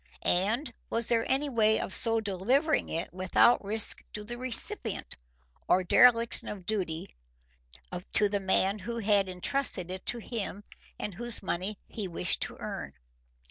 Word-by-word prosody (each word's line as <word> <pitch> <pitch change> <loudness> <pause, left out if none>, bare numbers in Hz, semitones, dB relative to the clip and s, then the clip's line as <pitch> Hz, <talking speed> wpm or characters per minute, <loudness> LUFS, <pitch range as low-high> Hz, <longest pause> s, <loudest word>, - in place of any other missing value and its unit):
And 230 +9 +1 0.2
was 230 0 0
there 230 -1 +1
any 275 +3 +1
way 220 -4 +2
of 190 - -2
so 225 -1 +5
delivering 230 - 0
it 165 +2 -4
without 185 +6 +3
risk 210 +2 0
to 210 - -6
the 240 +3 -7
recipient 250 - 0 0.5
or 185 - +3
dereliction 230 +4 +4
of 195 -4 -7
duty 175 - -3 1.0
to 210 - +4
the 205 0 -2
man 195 +1 +1
who 235 +4 -5
had 205 -3 +2
intrusted 185 -1 -1
it 185 0 -6
to 245 - +2
him 210 -3 -5 0.3
and 210 - -5
whose 235 +3 0
money 190 +3 -2
he 210 -4 -4
wished 175 0 -1
to - - -3
earn? 70 - -6
210 Hz, 150 wpm, -29 LUFS, 190-235 Hz, 1.0 s, so